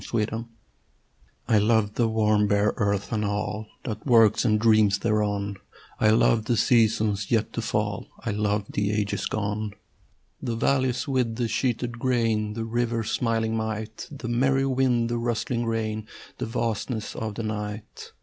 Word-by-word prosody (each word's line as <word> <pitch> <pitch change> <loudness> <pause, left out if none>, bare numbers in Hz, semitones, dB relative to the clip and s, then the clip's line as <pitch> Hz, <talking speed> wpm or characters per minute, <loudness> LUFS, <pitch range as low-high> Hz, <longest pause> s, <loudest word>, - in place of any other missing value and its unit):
AMOR 110 -2 0
VITÆ 115 +2 -5 1.0
I 110 - +4
love 105 -1 +2
the 115 0 +2
warm 105 -1 +2
bare 100 +1 +2
earth 100 -1 0
and 105 -1 0
all 105 +1 -2 0.2
That 110 -4 -5
works 115 -4 +5
and 105 -3 +3
dreams 110 -2 +4
thereon: 100 -2 0 0.4
I 110 - +4
love 110 0 +3
the 120 -1 +1
seasons 110 -4 +2
yet 115 -3 +1
to - - -2
fall: - - -2
I 115 - -2
love 105 0 0
the 100 0 0
ages 105 -1 -1
gone, 105 0 -3 0.7
The 115 - -2
valleys 130 +1 +1
with 125 -4 0
the 120 0 -1
sheeted 120 0 -1
grain, 115 -4 +1
The 115 0 -3
river's 115 -1 -1
smiling 115 -1 0
might, 110 0 -4
The 140 -4 -7
merry 135 +3 +2
wind, 130 -3 +2
the 120 0 -1
rustling 115 0 -1
rain, 110 -1 -2 0.3
The - - -2
vastness 115 -1 -2
of 110 -2 -4
the 115 - -4
night. 105 0 -6
110 Hz, 160 wpm, -26 LUFS, 105-120 Hz, 1.0 s, works